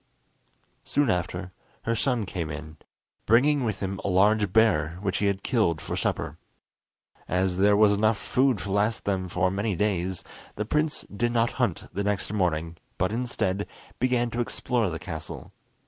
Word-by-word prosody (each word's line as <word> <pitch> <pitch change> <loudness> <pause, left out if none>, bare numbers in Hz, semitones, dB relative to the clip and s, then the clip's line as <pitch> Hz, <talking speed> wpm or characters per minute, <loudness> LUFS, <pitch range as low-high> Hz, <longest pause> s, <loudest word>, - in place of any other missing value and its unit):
Soon 145 -5 +2
after 90 +1 -2 0.3
her 115 - 0
son 120 -2 0
came 85 -4 -4
in, 75 0 -7 0.5
bringing 135 +5 +4
with 110 -4 -2
him 95 -1 -3
a - - -2
large 100 +1 +3
bear, 90 -7 +3
which 95 -2 0
he 100 - +2
had 100 0 -1
killed 105 - +1
for - - -4
supper. - - -2 0.9
As 90 0 +1
there 100 +1 +5
was 105 -1 +6
enough 110 +1 +2
food 130 +1 +2
to 100 +1 -5
last 105 +3 +1
them 95 -2 -1
for 90 +1 +1
many 100 +1 -1
days, 95 -2 -1 0.3
the 105 - -2
prince 150 +5 0
did 120 +3 +1
not 115 0 +2
hunt 110 -9 0
the 100 +3 -1
next 105 0 -1
morning, 85 -4 0 0.2
but, 95 +2 +1
instead, 110 -5 -1 0.3
began 125 -1 +1
to 120 - -3
explore 120 -2 0
the 80 - -4
castle. 80 -2 -7
100 Hz, 165 wpm, -26 LUFS, 90-115 Hz, 0.9 s, was